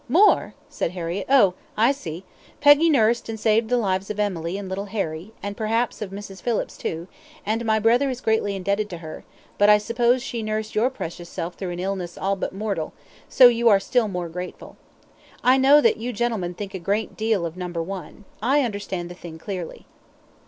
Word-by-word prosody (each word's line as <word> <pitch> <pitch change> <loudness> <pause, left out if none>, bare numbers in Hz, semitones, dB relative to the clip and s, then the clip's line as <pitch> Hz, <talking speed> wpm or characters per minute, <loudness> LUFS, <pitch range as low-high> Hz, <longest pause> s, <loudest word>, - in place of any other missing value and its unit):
"More!" 375 - +4
said 165 - -3
Harriett; 175 +1 -4
"oh! 245 -9 +5 0.2
I 230 +5 +5
see. 195 - -6 0.4
Peggy 290 +3 +6
nursed 235 -5 +2
and 220 -1 -4
saved 220 +1 +2
the 245 - +3
lives 195 -4 -1
of 210 -1 -4
Emily 185 -3 -1
and 200 -1 -6
little 190 +2 -4
Harry, 195 -2 -4
and 200 0 -4
perhaps 225 +3 -1
of 210 - -3
Mrs. 195 -1 -9
Phillips, 235 -3 -1
too, 165 +2 -4 0.4
and 225 +3 -1
my 220 -1 +3
brother 235 +6 +3
is 255 -2 -4
greatly 220 -4 0
indebted 200 +2 -1
to 175 - -6
her; 160 -2 -9 0.4
but 205 +1 +6
I 210 - +8
suppose 235 +3 +1
she 240 -3 -4
nursed 215 0 -3
your 225 +4 +2
precious 175 -8 -7
self 170 +2 -4
through 185 +1 -5
an 175 0 -5
illness 185 -2 -3
all 195 +1 0
but 195 - -3
mortal, 195 -5 -3 0.4
so 255 - +8
you 235 -1 +4
are 200 -2 +6
still 235 +3 +1
more 180 -3 -3
grateful. 180 +2 -8 0.7
I 255 +2 +5
know 275 +3 +7
that - - +3
you 235 +3 -4
gentlemen 210 -6 -1
think 200 +1 -6
a 190 - -4
great 200 +5 -1
deal 220 -5 0
of 165 0 -5
number 175 -2 -4
one. 195 +3 -8 0.2
I 270 +6 +3
understand 200 -6 -4
the - - -6
thing 170 -2 -10
clearly." 180 0 -6
205 Hz, 200 wpm, -23 LUFS, 185-230 Hz, 0.7 s, I